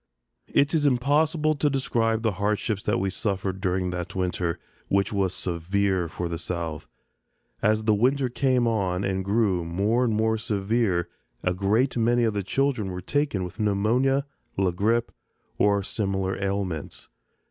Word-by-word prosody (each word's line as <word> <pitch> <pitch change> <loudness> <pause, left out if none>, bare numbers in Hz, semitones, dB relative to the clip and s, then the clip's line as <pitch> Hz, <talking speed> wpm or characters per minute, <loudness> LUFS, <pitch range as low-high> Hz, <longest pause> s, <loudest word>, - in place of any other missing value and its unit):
It 140 +2 +2
is 150 -3 +3
impossible 150 +4 +2
to 150 0 +1
describe 115 -5 0
the 110 - +2
hardships 105 0 0
that - - +2
we 95 0 -1
suffered 95 -1 -2
during 90 -1 0
that 90 +2 -5
winter, 90 -2 -1 0.3
which 100 +1 +1
was 95 -2 +1
severe 95 +1 -1
for 85 +2 -4
the 85 -1 -4
South. 85 -3 -4 0.7
As 110 0 +2
the 110 0 +3
winter 130 +5 +2
came 125 -1 +1
on 95 -5 0
and 95 -1 -1
grew 100 -3 +1
more 100 +9 +1
and 115 -3 +1
more 110 0 +1
severe 100 -4 0 0.4
a 90 - +1
great 105 +8 +1
many 120 +1 +3
of 110 -2 +1
the 100 - -1
children 125 0 0
were 90 0 -5
taken 140 -1 -1
with 90 +4 -8
pneumonia, 115 +7 +2 0.3
la 95 -2 +2
grippe, 115 +6 +1 0.5
and 100 -1 +3
similar 95 -3 -1
ailments. 95 -6 -3
100 Hz, 155 wpm, -25 LUFS, 95-120 Hz, 0.7 s, is